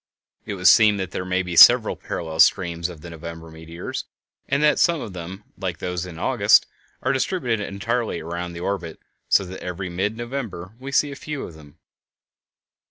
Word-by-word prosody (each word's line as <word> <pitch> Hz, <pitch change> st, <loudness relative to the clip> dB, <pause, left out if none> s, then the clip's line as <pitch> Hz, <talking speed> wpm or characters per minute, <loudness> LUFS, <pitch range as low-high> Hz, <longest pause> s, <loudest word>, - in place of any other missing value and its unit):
It 105 Hz, -, -3 dB
would 90 Hz, 0 st, +2 dB
seem 105 Hz, -2 st, +6 dB
that 95 Hz, -2 st, -4 dB
there -, -, -3 dB
may 95 Hz, 0 st, 0 dB
be 90 Hz, -1 st, -5 dB
several -, -, +8 dB
parallel 80 Hz, -2 st, -6 dB
streams 85 Hz, 0 st, +3 dB
of 85 Hz, -4 st, -11 dB
the 85 Hz, -, -9 dB
November 80 Hz, 0 st, -9 dB
meteors, 80 Hz, +1 st, -7 dB, 0.4 s
and 140 Hz, +2 st, +1 dB
that 150 Hz, -, +4 dB
some 170 Hz, -2 st, +3 dB
of 105 Hz, -, -7 dB
them, 90 Hz, +3 st, -8 dB, 0.2 s
like 90 Hz, -4 st, -3 dB
those 90 Hz, +1 st, -4 dB
of 85 Hz, -3 st, -10 dB
August, -, -, +4 dB, 0.4 s
are -, -, +1 dB
distributed 130 Hz, -, -1 dB
entirely 110 Hz, 0 st, -2 dB
around 85 Hz, +2 st, -5 dB
the 85 Hz, -, -7 dB
orbit, 90 Hz, -4 st, -4 dB, 0.3 s
so 100 Hz, -, +4 dB
that 95 Hz, +1 st, -9 dB
every 90 Hz, +1 st, -5 dB
mid 100 Hz, +5 st, -2 dB
November 115 Hz, -7 st, -6 dB
we 135 Hz, +1 st, -7 dB
see 145 Hz, +1 st, +2 dB
a -, -, -7 dB
few 150 Hz, 0 st, -6 dB
of -, -, -8 dB
them. 75 Hz, 0 st, -16 dB
90 Hz, 185 wpm, -23 LUFS, 85-110 Hz, 0.4 s, several